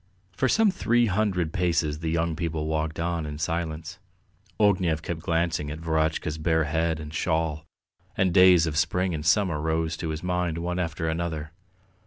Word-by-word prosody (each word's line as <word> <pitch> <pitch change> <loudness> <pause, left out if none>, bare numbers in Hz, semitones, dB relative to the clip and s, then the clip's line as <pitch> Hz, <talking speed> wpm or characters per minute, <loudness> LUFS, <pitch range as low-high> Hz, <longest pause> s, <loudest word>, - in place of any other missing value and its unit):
For 130 - +1
some 220 - +4
three 120 -9 +2
hundred 95 -5 0
paces 85 -5 0
the 80 -1 -2
young 85 0 0
people 80 -2 -2
walked 80 0 -2
on 85 -2 -1
in 75 0 -6
silence. 80 0 -3 0.6
Ognev 90 -7 +2
kept 85 -2 -4
glancing 80 -2 -1
at 75 +2 -6
Verotchka's 80 -1 -1
bare 80 0 +2
head 80 +1 0
and 75 -1 -8
shawl, 80 -1 -1 0.5
and 95 -2 +2
days 90 -2 +7
of 80 -2 -2
spring 90 +2 +1
and 75 -2 -3
summer 85 -1 +2
rose 80 0 0
to 80 - -4
his 80 +2 -4
mind 90 -2 -1
one 90 +1 -2
after 80 -2 -2
another. 80 -1 -3
80 Hz, 170 wpm, -26 LUFS, 80-90 Hz, 0.6 s, days